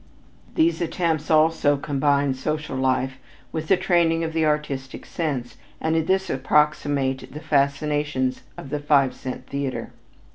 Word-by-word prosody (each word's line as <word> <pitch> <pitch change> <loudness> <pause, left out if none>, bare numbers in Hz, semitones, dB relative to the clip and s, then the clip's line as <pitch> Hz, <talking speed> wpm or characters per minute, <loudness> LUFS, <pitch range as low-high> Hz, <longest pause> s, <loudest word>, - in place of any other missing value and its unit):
These 325 - +2
attempts 165 -2 -1
also 155 -2 +4
combine 140 0 +1
social 150 +2 -3
life 130 0 0 0.3
with 160 -1 -4
the 190 - +4
training 170 -3 +2
of 160 0 -3
the 160 -1 +2
artistic 145 -3 -2
sense 135 -7 -3 0.2
and 160 0 0
in 160 -1 +1
this 190 0 +2
approximate 140 -1 +1
the 150 - -7
fascinations 145 -2 0 0.2
of 135 - -9
the 150 - -1
five 145 -3 +3
cent 130 0 -7
theater. 140 -1 -4
150 Hz, 140 wpm, -24 LUFS, 135-160 Hz, 0.3 s, also